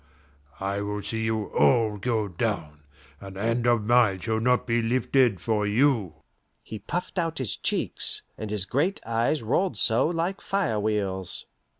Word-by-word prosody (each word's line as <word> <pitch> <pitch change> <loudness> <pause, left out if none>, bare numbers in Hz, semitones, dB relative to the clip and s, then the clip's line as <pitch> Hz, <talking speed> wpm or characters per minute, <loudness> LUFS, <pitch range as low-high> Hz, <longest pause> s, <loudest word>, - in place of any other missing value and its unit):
I 100 +1 -2
will 105 0 -4
see 110 -1 -3
you 110 -1 -1
all 110 -5 +3
go 110 -1 0
down, 85 -6 -3 0.4
and 95 -1 -10
hand 115 +3 0
of 120 -3 +3
mine 115 -4 +3
shall 110 +3 -1
not 125 +2 +2
be 120 -1 +1
lifted 120 -2 +2
for 105 +3 0
you!" 105 - +1 0.4
He 110 - -7
puffed 180 - -4
out 165 -2 -2
his 125 -7 -2
cheeks, - - 0
and 110 - -6
his 105 -2 -1
great 155 - 0
eyes 115 +5 0
rolled 175 - 0
so 115 +5 +4
like 175 +3 -2
fire 190 - -1
wheels. 100 -3 -1
110 Hz, 160 wpm, -26 LUFS, 105-125 Hz, 0.4 s, so